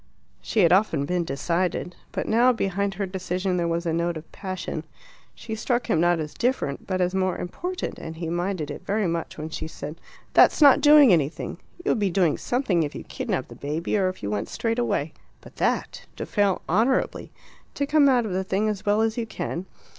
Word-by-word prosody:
She 220 - +1
had 170 -1 +5
often 180 -8 +2
been 180 +3 0
decided. 170 +5 -1 0.2
But - - -3
now 240 +3 +5
behind 200 -3 -1
her 200 +1 -2
decision 185 0 -2
there 170 -1 0
was 170 +1 -1
a 165 - 0
note 170 0 0
of 155 - -11
passion. 185 -2 -5 0.5
She 220 - -7
struck 240 +3 -1
him 160 - +3
not 175 -1 +3
as 150 -1 -4
different, 240 - -1
but 185 -1 -1
as 180 +1 +1
more 185 -1 0
important, 355 - -4
and 160 - -7
he 165 0 -5
minded 175 -2 -2
it - - -8
very 210 +1 0
much 170 -1 -3
when 155 +1 -6
she 160 - -4
said 155 0 -8 0.3
"That's - - +6
not 290 -1 +7
doing 290 -6 +8
anything! 155 -2 -1 0.3
You - - +1
would - - +1
be 200 -2 +2
doing 175 -4 +2
something 240 -9 +1
if 150 -2 -3
you - - -6
kidnapped - - -3
the - - -10
baby, 155 +7 -2
or 190 -3 +2
if 185 - -9
you 100 - -2
went 105 -1 -2
straight 230 +1 -1
away. 240 - -1 0.3
But - - -16
that! - - -1
To - - -5
fail 200 -3 +1
honourably! 225 +9 +1 0.4
To 280 - 0
come 290 -1 +4
out 245 -3 +3
of 210 - -4
the 190 +1 0
thing 195 +3 0
as 210 -1 -3
well 205 +1 +2
as 225 +1 0
you 230 - -3
can! 175 -1 -4
185 Hz, 215 wpm, -25 LUFS, 170-220 Hz, 0.5 s, doing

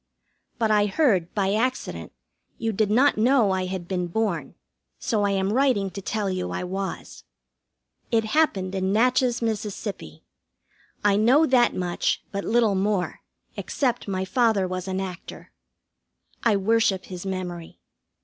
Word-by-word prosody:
But 225 -2 +1
I 210 -1 +4
heard, 195 - +2
by 195 -1 +1
accident, 255 +4 -2 0.5
you 225 -1 -1
did 215 0 0
not 250 +2 +3
know 235 -3 +4
I 185 -1 -1
had 185 -2 -5
been 180 -1 -2
born, 175 -4 -2 0.4
so 215 -2 -1
I - - +2
am 195 +1 0
writing 250 -7 +2
to 195 - -7
tell 210 +1 -2
you 185 -1 -2
I - - -3
was. 190 +2 -5 0.9
It 225 -1 +2
happened 215 -7 +1
in 190 0 -1
Natchez, 245 +2 +2
Miss. 220 -2 -1 1.4
I 205 -1 +5
know 255 +9 +5
that 250 -4 +3
much, 180 -1 -1
but 200 -1 -3
little 230 -2 +2
more, 195 -1 -1 0.4
except 245 -5 -2
my 190 -1 -2
father 215 -2 +2
was 185 0 -4
an 190 0 -2
actor. 185 -2 -7 0.9
I 225 -3 +3
worship 200 -1 +1
his 180 -2 -7
memory. 180 -3 -5
200 Hz, 145 wpm, -24 LUFS, 190-230 Hz, 1.4 s, I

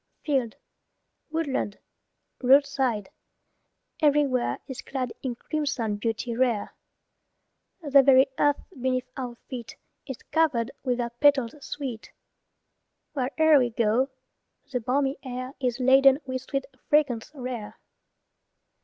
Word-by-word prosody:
Field, 265 -7 0 0.7
woodland, 300 -10 -2 0.6
roadside, 265 -5 +3 0.9
everywhere, 285 -4 +2
Is 265 -3 -6
clad 260 -2 -4
in 255 -3 -3
crimson 250 -7 -2
beauty 230 +2 -2
rare. 240 -4 0 1.1
The 280 -2 +6
very 265 0 +6
earth 290 -1 +2
beneath 255 -4 -2
our 250 -2 -5
feet 245 -4 -7 0.3
Is 265 -4 -5
covered 270 -7 +2
with 250 -2 0
their 240 -1 -2
petals 270 -1 +3
sweet; 260 -6 -6 1.0
Where'er 295 +3 +4
we 245 -2 +2
go 230 +3 +1 0.6
the 250 - 0
balmy 270 +4 0
air 255 0 -6
Is 250 -2 -1
laden 265 +1 +6
with 260 -1 -3
sweet 275 0 -3 0.2
fragrance 275 -7 +2
rare. 245 -5 -6
260 Hz, 110 wpm, -26 LUFS, 240-280 Hz, 1.1 s, The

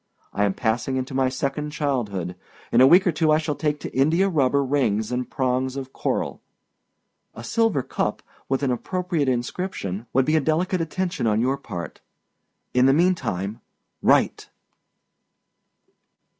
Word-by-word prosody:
I 105 - +2
am 100 - 0
passing 120 +3 -1
into 130 +1 -4
my 130 -1 +2
second 140 +3 -2
childhood. 115 - -2 0.4
In 120 - +5
a 130 - +8
week 180 +6 +6
or 180 - +3
two 155 0 +2
I 155 - +5
shall 155 -1 -1
take 150 0 -1
to - - -7
India 165 +9 +3
rubber 140 -4 +2
rings 115 -6 0
and 125 0 -2
prongs 130 0 -1
of 135 -1 -6
coral. - - -2 0.9
A 115 - -8
silver 210 - +1
cup, - - -2 0.3
with 135 +1 0
an 135 - +2
appropriate 170 +2 -1
inscription, 120 - -3
would 130 0 +3
be 155 - +2
a 155 - +3
delicate 170 +5 0
attention 175 -3 -2
on 105 0 +2
your 130 +4 +1
part. 90 -11 -7 0.7
In 125 +1 +4
the 135 - +5
mean 175 +5 +4
time, 100 - -4 0.4
write! - - +2
135 Hz, 155 wpm, -24 LUFS, 125-155 Hz, 0.9 s, a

